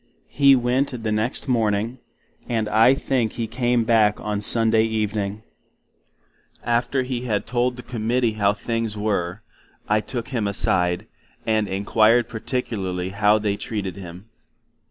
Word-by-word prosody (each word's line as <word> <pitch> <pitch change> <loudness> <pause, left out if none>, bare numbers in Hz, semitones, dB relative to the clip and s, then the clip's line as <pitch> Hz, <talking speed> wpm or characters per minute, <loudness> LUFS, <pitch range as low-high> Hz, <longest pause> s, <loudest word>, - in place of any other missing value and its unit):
He 140 -1 +5
went 125 0 0
the 110 - -1
next 110 +6 -1
morning; 115 0 0 0.5
and 110 -3 0
I 115 +5 +5
think 125 -5 -1
he 115 - -3
came 120 +1 0
back 110 -2 +3
on 105 -1 -3
Sunday 110 0 +3
evening. 105 -1 -2 1.2
After 120 +3 0
He 125 -1 -4
had 105 -4 -1
told 125 +1 0
the 125 - -10
Committee 120 0 0
how 105 -2 +1
things 115 0 -3
were, 105 -1 -2 0.4
I 105 +1 +3
took 120 +1 -5
him 115 -6 -1
a 100 - -3
side, 90 +2 +1 0.4
and 110 -2 +1
inquired 110 +4 +3
particularly 100 -7 -3
how 105 +2 +3
they 105 -1 -1
treated 100 -4 -4
him? 90 0 -10
110 Hz, 140 wpm, -23 LUFS, 105-120 Hz, 1.2 s, He